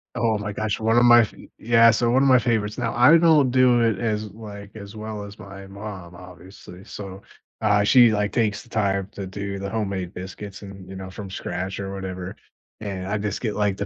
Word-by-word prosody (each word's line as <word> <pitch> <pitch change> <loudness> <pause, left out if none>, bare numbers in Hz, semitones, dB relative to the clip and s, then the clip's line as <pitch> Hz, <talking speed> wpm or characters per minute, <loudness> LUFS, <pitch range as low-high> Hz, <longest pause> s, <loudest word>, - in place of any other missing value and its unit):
Oh 115 -3 +1
my 105 0 -4
gosh. 110 -1 -2
One 110 +1 +2
of 120 - +5
my 120 -1 +8
fa 105 - -8 0.2
yeah, 115 0 +5
so 115 +1 +1
one 130 +2 +3
of 140 - +4
my 130 - +7
favorites. 110 -3 -1
Now, 115 -3 -2
I 125 +7 +7
don't 155 -5 +4
do 125 -1 +4
it 115 -4 +2
as, 110 -2 -2
like, 100 -1 -11
as 100 0 -10
well 110 -1 -6
as 100 +1 -11
my 95 -1 -10
mom, 95 -3 -9
obviously. 90 +1 -13
So, 95 -1 -9 0.4
uh, 105 -2 +3
she, 120 +2 +6
like, 105 -1 0
takes 105 -3 0
the 120 - -19
time 100 -3 0
to 100 - -6
do 100 +1 -5
the 100 0 -5
homemade 100 -4 -3
biscuits 95 +2 -8
and, 100 -2 -11
you 95 - -8
know, 95 0 -7
from 100 +1 -8
scratch 95 +1 -5
or 95 -1 -5
whatever. 95 -1 -6 0.5
And 95 -3 -5
I 105 +2 -1
just 105 -1 -3
get, 110 -4 -2
like, 105 -2 0
the 100 - -3
105 Hz, 220 wpm, -23 LUFS, 95-115 Hz, 0.5 s, my